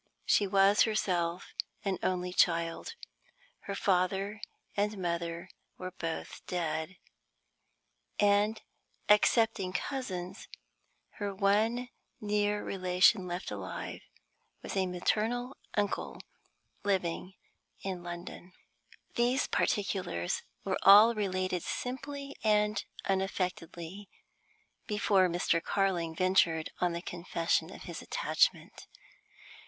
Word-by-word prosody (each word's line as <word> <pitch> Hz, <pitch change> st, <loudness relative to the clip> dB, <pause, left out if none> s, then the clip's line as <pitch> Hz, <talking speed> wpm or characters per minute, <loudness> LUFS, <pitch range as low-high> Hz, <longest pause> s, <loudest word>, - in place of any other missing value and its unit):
She 205 Hz, -, +3 dB
was 195 Hz, +1 st, +5 dB
herself 180 Hz, -5 st, 0 dB, 0.3 s
an 195 Hz, -2 st, 0 dB
only 180 Hz, -1 st, -1 dB
child; 170 Hz, -, +1 dB, 0.7 s
her 200 Hz, -, -3 dB
father 195 Hz, +2 st, +1 dB, 0.3 s
and 205 Hz, +1 st, 0 dB
mother 170 Hz, 0 st, -3 dB, 0.3 s
were 185 Hz, 0 st, -6 dB
both 165 Hz, -2 st, -5 dB
dead; 170 Hz, 0 st, -2 dB, 1.2 s
and, 205 Hz, +1 st, +3 dB, 0.5 s
excepting 210 Hz, -2 st, +4 dB
cousins, 190 Hz, -8 st, -4 dB, 0.7 s
her 200 Hz, -2 st, -3 dB
one 220 Hz, +5 st, +2 dB, 0.3 s
near 210 Hz, 0 st, 0 dB
relation 185 Hz, +1 st, +3 dB
left 175 Hz, +1 st, -4 dB
alive -, -, -5 dB, 0.6 s
was -, -, -5 dB
a 190 Hz, -1 st, +2 dB
maternal 225 Hz, +8 st, -1 dB, 0.2 s
uncle 205 Hz, -1 st, -1 dB, 0.6 s
living 190 Hz, -1 st, -1 dB, 0.5 s
in 185 Hz, -2 st, -3 dB
London. 175 Hz, +1 st, -8 dB, 0.6 s
These 245 Hz, +3 st, +2 dB
particulars 185 Hz, -, -1 dB, 0.2 s
were -, -, -1 dB
all 210 Hz, +4 st, +9 dB
related 185 Hz, -4 st, -1 dB
simply 280 Hz, +2 st, -5 dB
and 210 Hz, -1 st, +2 dB, 0.2 s
unaffectedly 190 Hz, -1 st, -3 dB, 0.8 s
before 205 Hz, -4 st, +3 dB
Mr. 170 Hz, -1 st, +1 dB
Carling 175 Hz, -5 st, 0 dB
ventured 170 Hz, -3 st, +2 dB
on 175 Hz, -1 st, +1 dB
the 170 Hz, +1 st, -4 dB
confession 170 Hz, -1 st, -1 dB
of -, -, -10 dB
his -, -, -7 dB
attachment. -, -, 0 dB
190 Hz, 95 wpm, -31 LUFS, 175-210 Hz, 1.2 s, all